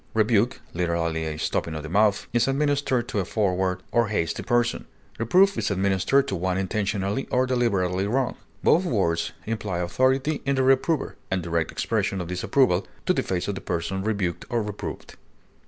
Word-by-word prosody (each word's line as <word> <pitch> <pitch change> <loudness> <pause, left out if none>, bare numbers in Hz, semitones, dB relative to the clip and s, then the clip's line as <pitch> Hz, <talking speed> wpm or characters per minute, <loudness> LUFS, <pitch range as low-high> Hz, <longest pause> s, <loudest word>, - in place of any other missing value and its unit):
Rebuke, 110 +2 +2
literally 85 -2 -1
a 75 -1 -4
stopping 80 +1 -2
of 75 - -5
the - - -5
mouth, 100 +2 +3
is 120 +1 +3
administered 135 -3 +1
to 105 - -1
a - - +1
forward 95 -2 0
or 120 -1 +3
hasty 95 -6 -1
person; 120 -1 0 0.3
reproof 190 - +4
is - - 0
administered 100 +8 +2
to 95 - -2
one 90 +1 -1
intentionally 100 +3 -1
or 125 +1 +2
deliberately 100 -7 +1
wrong; 130 +4 0 0.3
both 170 - +4
words 95 - 0
imply 110 -5 -3
authority 130 - +1
in 140 0 +1
the 130 - +2
reprover, 135 +3 +2
and 95 -2 -1
direct 85 -1 -1
expression 100 -3 -1
of 90 -2 -5
disapproval 90 +1 +2 0.2
to - - +3
the - - +1
face 90 -2 -2
of 100 - -1
the 95 - -6
person 90 +3 -2
rebuked 100 -5 -1
or 120 -3 0
reproved. 105 -1 -7
100 Hz, 170 wpm, -25 LUFS, 90-125 Hz, 0.3 s, reproof